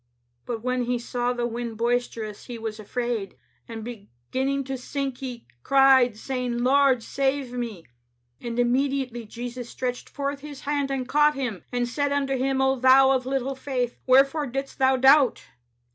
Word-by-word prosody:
"'But 230 -2 -4
when 250 0 0
he 245 0 0
saw 245 +1 -2
the 240 -1 -2
wind 235 -1 -4
boisterous, 230 -2 -2
he 240 -2 -7
was 220 -1 -5
afraid; 225 - -3 0.3
and 225 -1 -7
beginning 240 - -4
to 270 0 -4
sink, 270 0 -4
he 250 -3 -7 0.2
cried, 265 - +5
saying. 245 0 -3
Lord, 265 -2 +4
save 270 -1 -1
me. 230 -8 -5 0.6
"*And 235 -1 -5
immediately 250 -1 0
Jesus 240 +1 -7
stretched 250 -1 -4
forth 280 0 -3
His 290 -1 -9
hand 285 -1 -1
and 265 -2 -2
caught 300 +1 +4
him, 245 -9 -4
and 245 -1 0
said 285 +3 -1
unto 275 -1 0
him, 265 +1 0
O 265 0 +2
thou 265 +1 +6
of 260 -1 0
little 270 0 -1
faith, 260 -2 -3
wherefore 275 +3 +4
didst 270 +3 -5
thou 265 0 +4
doubt? 270 +1 +5
255 Hz, 160 wpm, -25 LUFS, 240-270 Hz, 0.6 s, thou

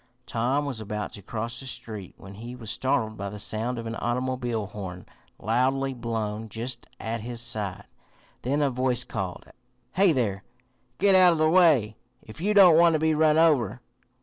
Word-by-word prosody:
Tom 130 +5 0
was 135 -5 -4
about 105 -1 -4
to 100 - -10
cross 115 +3 -5
the 135 - -9
street 110 -6 -7
when 95 +1 -12
he 120 +5 -8
was 115 -4 -6
startled 125 -5 0
by 100 0 -4
the 105 - -8
sound 110 +4 -2
of 115 - -5
an 115 0 -4
automobile 120 -2 -2
horn 95 -3 -8 0.3
loudly 130 +4 0
blown 110 -2 -4
just 120 +3 -6
at 115 0 -3
his 120 +1 -6
side. 100 -4 -4 0.6
Then 145 +4 0
a 140 - +1
voice 125 -1 0
called: 95 -6 -5 0.5
"Hey, 190 +3 +4
there! 105 -9 -1 0.5
Git 200 0 +4
out 185 -2 +7
of - - -2
the 155 0 +3
way 150 - +4 0.3
if 110 +8 -11
you 210 +3 +1
don't 180 -5 +8
want 170 -1 +6
to 155 - +2
be 160 0 +2
run 155 0 +3
over!" 140 -10 +3
120 Hz, 180 wpm, -26 LUFS, 110-140 Hz, 0.6 s, don't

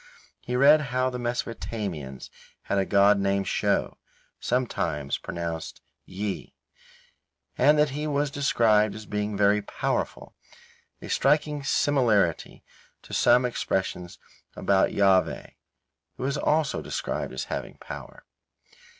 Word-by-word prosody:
He 125 - -4
read 145 +4 +6
how 130 +1 0
the 125 - -5
Mesopotamians 105 - -4 0.3
had 100 - 0
a 95 - 0
god 100 0 +5
named 100 -1 0
Sho - - 0 0.4
(sometimes 80 - -1
pronounced 85 -1 -5 0.3
Ji), 100 +1 -5 1.0
and 150 +4 +4
that 150 -1 +3
he 150 +2 -3
was 145 -1 0
described 110 -7 +2
as 110 0 -9
being 105 0 -3
very 105 +1 +3
powerful, 100 - -3 0.7
a - - -7
striking 150 +1 +1
similarity 120 - +1 0.4
to - - -12
some 125 +1 +4
expressions 95 -6 -2 0.4
about 95 -1 +2
Jahveh, 95 -2 +2 0.7
who - - -4
is 140 +1 -1
also 150 0 +1
described - - -4
as 65 - -4
having - - -5
power. - - -10
110 Hz, 115 wpm, -26 LUFS, 100-135 Hz, 1.0 s, read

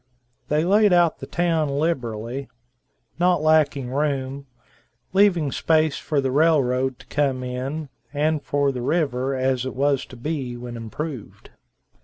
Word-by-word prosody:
They 150 +1 +1
laid 205 +1 +4
out 175 -2 +3
the - - -8
town 165 -3 0
liberally, 130 -4 -2 0.7
not 180 0 +3
lacking 150 -5 +2
room, 140 -1 -2 0.7
leaving 185 -7 +3
space 155 0 +2
for 150 - -1
the 135 -1 0
railroad 130 -4 +2
to - - -16
come 135 -3 0
in, 130 +5 -4 0.2
and 150 +1 0
for 140 -1 +1
the 125 -2 -5
river 135 -2 0
as 130 -1 0
it 130 - -5
was 140 0 +1
to - - -12
be 130 -1 -4
when 120 0 -7
improved. 120 +2 -7
140 Hz, 140 wpm, -23 LUFS, 130-155 Hz, 0.7 s, laid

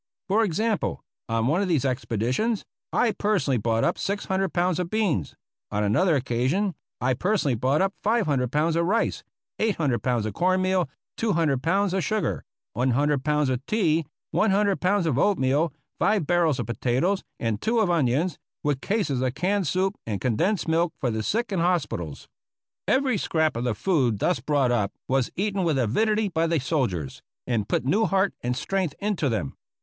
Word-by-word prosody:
For 210 +4 +3
example, 215 +3 -1 0.3
on 115 0 +1
one 155 +9 +2
of 200 - 0
these 155 -7 +1
expeditions 130 - -1 0.3
I 240 - +2
personally 200 - 0
brought 115 +1 +1
up - - +1
600 195 -2 -1
pounds 180 0 +1
of 180 -2 -2
beans; 185 - 0 0.3
on 105 0 -1
another 130 - +3
occasion 135 - 0 0.3
I 130 +1 +1
personally 180 - +1
brought 130 - +1
up 195 0 0
500 150 - +1
pounds 155 +3 +1
of 170 0 +1
rice, 225 +4 0 0.4
800 160 - +1
pounds 120 -4 0
of 110 - -3
cornmeal, 185 0 +1 0.3
200 165 - +1
pounds 190 +5 +1
of 190 -2 0
sugar, 215 +2 -1 0.3
100 130 +4 +1
pounds 150 -1 +1
of 130 0 -1
tea, 165 -8 +1 0.2
100 200 -1 +2
pounds 185 0 +2
of 145 -5 +1
oatmeal, 150 -4 +2 0.3
5 210 -7 +2
barrels 170 -4 +2
of - - -2
potatoes, 130 +11 0 0.2
and 115 -2 -1
two 235 +2 +1
of 205 -5 +2
onions, 150 +2 +1 0.2
with 145 -3 0
cases 185 - 0
of 130 -1 -1
canned 190 +1 0
soup 190 +5 0
and 105 -3 -2
condensed 170 - 0
milk 165 +1 +1
for 125 -5 0
the 110 0 -2
sick 225 - -1
in 190 - 0
hospitals. 165 - -1 0.6
Every 260 -6 +2
scrap 160 -4 +1
of 120 +1 -2
the 120 -3 0
food 130 - +1
thus 110 - +1
brought 135 -1 +1
up 105 -4 0
was 130 -2 +1
eaten 200 0 -1
with 160 -5 +1
avidity 210 - +1
by 165 -3 0
the 165 -1 +1
soldiers, 120 - -2 0.2
and 115 -5 -1
put - - 0
new 210 +11 +3
heart 195 +2 +1
and 125 +1 -2
strength 180 +1 -1
into 200 -8 0
them. 100 - -2
160 Hz, 175 wpm, -25 LUFS, 125-195 Hz, 0.6 s, For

